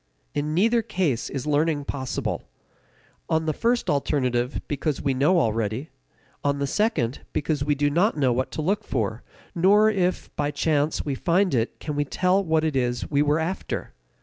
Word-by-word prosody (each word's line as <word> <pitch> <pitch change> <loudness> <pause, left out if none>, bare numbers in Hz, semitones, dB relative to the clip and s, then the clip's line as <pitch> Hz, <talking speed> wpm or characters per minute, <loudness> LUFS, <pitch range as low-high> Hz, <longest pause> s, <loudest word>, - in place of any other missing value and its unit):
In 150 +1 -1
neither 230 +6 +3
case 180 - -1
is 135 -1 -4
learning 150 0 +1
possible; 130 -3 -3 0.8
on 160 0 +1
the 155 - 0
first 235 +8 0
alternative 130 -3 0
because 145 0 -1
we 140 -2 0
know 150 +8 +3
already; 115 +2 -1 0.5
on 140 0 +1
the 140 - -1
second, 140 - 0
because 150 -1 0
we 145 0 +1
do 145 +1 +1
not 170 +7 +2
know 130 -4 +3
what 130 +2 -1
to 155 - -3
look 200 +6 0
for, 115 - -2 0.3
nor 205 +5 +5
if, 185 -3 -1
by 145 -1 0
chance, 150 +1 0
we 145 - -1
find 180 +6 +1
it 115 -2 -1
can 150 - -4
we 145 - +1
tell 185 +6 +1
that 160 -3 +1
it 155 -3 0
is 125 -2 0
what - - -9
we 145 -1 +3
were 150 +1 +3
after. 165 +4 -3
150 Hz, 180 wpm, -25 LUFS, 135-175 Hz, 0.8 s, nor